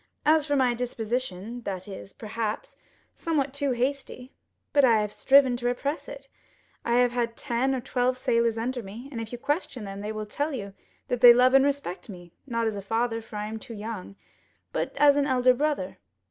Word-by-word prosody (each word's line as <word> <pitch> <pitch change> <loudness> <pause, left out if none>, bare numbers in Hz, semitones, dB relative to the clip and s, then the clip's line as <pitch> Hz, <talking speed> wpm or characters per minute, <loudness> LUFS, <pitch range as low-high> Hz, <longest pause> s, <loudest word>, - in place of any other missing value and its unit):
As 310 0 +4
for 290 - +1
my 255 -3 +3
disposition, 240 -2 -3
that 190 -4 -5
is, 195 0 -9
perhaps, 220 0 -4 0.4
somewhat 285 -5 -1
too 285 0 -1
hasty; 255 +1 -3 0.4
but 285 - +5
I 235 -4 +6
have 210 -1 -2
striven 270 -2 +5
to 240 0 -2
repress 280 +5 -2
it. - - -10 0.6
I 235 - 0
have 245 0 +4
had 235 -1 -2
ten 265 +1 0
or 255 - -3
twelve 250 0 0
sailors 230 -2 +1
under 245 +2 -2
me, 225 +6 -9
and 230 -4 -4
if 225 - -7
you 245 - -5
question 275 - -2
them, 195 0 -6
they 210 +1 -4
will 215 0 -4
tell 290 +8 -2
you 200 -5 -6 0.3
that 245 -1 -2
they 240 -1 +10
love 255 +1 +5
and 270 0 +7
respect 280 -10 -2
me, 175 -3 -11
not 230 -2 -1
as 220 -2 -1
a 200 - -4
father, 225 +3 -1
for 220 -1 -12
I 210 0 -3
am 220 +1 -5
too 230 0 -9
young, 210 -2 -6 0.6
but - - -1
as 285 0 +6
an 285 0 +2
elder 255 -1 +4
brother." 250 -10 -2
240 Hz, 200 wpm, -27 LUFS, 220-270 Hz, 0.6 s, they